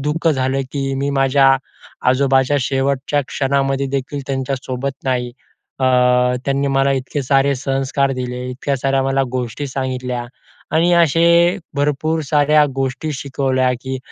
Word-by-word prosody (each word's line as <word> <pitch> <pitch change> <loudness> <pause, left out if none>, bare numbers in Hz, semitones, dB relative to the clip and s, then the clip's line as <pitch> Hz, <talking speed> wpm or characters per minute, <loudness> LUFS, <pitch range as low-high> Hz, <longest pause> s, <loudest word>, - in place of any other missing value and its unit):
दुःख 150 +4 0
झालं, 135 -2 0
की 135 -1 -2
मी 140 +1 -1
माझ्या 135 0 +4 0.5
आजोबाच्या 135 +1 +3
शेवटच्या 135 +2 0
क्षणामध्ये 135 0 0
देखील 135 +2 -4
त्यांच्यासोबत 135 0 -3
नाही. 125 -2 -1 0.5
अ, - - +2 0.6
त्यांनी 140 0 0
मला 135 0 +2
इतके 135 +2 -3
सारे 135 +1 +2
संस्कार 135 +1 -1
दिले, 125 -1 -4
इतक्या 135 +2 -2
साऱ्या 135 +1 0
मला 135 0 +1
गोष्टी 125 +2 -3
सांगितल्या 130 -2 -3 0.5
आणि 170 +2 +3
असे 170 +2 +4 0.2
भरपूर 150 +3 0
साऱ्या 150 +1 +3
गोष्टी 135 +3 -2
शिकवल्या, 130 -1 0
की 130 0 -4
135 Hz, 130 wpm, -18 LUFS, 130-140 Hz, 0.6 s, माझ्या